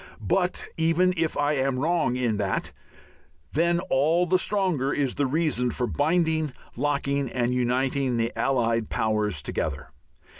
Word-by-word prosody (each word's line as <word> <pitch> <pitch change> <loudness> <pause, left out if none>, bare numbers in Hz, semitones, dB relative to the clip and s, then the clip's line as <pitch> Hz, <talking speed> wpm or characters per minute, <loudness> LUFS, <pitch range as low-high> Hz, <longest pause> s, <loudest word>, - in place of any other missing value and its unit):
But 180 - +1
even 165 +3 +2
if 165 -2 -1
I 145 +1 +2
am 135 -2 0
wrong 160 -2 +1
in 120 -4 0
that, 100 -2 -2 0.8
then 170 +3 +2
all 160 +4 +2
the 185 +1 +2
stronger 180 -10 0
is 140 -3 0
the 145 - 0
reason 145 -4 0
for 125 +2 -1
binding, 160 +1 +1 0.2
locking 140 0 -1
and 120 0 0
uniting 125 +1 0
the 115 +1 -1
allied 115 -4 0
powers 105 -7 0
together. 75 -1 -3
140 Hz, 140 wpm, -25 LUFS, 120-160 Hz, 0.8 s, even